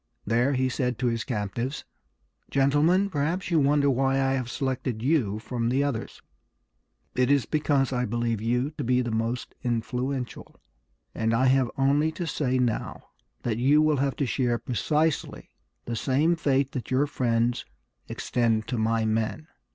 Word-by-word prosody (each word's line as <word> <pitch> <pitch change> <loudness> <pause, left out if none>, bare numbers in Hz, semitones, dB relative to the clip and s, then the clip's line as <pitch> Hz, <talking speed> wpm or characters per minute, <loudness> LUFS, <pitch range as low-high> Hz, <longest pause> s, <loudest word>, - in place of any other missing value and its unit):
There 120 +6 +2
he 130 0 +1
said 125 -2 -1
to 125 - -2
his 115 -1 0
captives, 120 +2 -3 0.6
"Gentlemen, 150 +8 +3
perhaps 165 +1 -2
you 165 - +4
wonder 140 0 +3
why 135 0 +2
I 135 0 +2
have 130 -3 -2
selected 130 -4 -3
you 125 -8 +1
from 115 +1 -2
the 135 +3 +2
others. 140 -6 -4 0.9
It 125 0 +1
is 140 -5 +3
because 145 -3 +1
I 125 0 0
believe 115 -1 -1
you 125 +5 0
to - - -1
be 125 +1 +2
the 120 - -3
most 115 +2 -2
influential; 125 +2 -3 0.5
and 115 0 0
I 130 +3 +2
have 130 -1 +3
only 145 +3 +2
to 175 - -4
say 130 -5 0
now 120 -3 -2 0.3
that 115 -1 -1
you 140 +5 +4
will 155 -1 +3
have 135 0 0
to 140 - -1
share 120 -2 0
precisely 150 +6 -1 0.3
the 120 - -3
same 145 +8 +2
fate 140 -4 +1
that 125 - -5
your 130 +3 +2
friends 120 -4 0 0.5
extend 115 -3 0
to 125 - -1
my 110 0 +1
men." 110 +8 -1
130 Hz, 160 wpm, -26 LUFS, 120-140 Hz, 0.9 s, you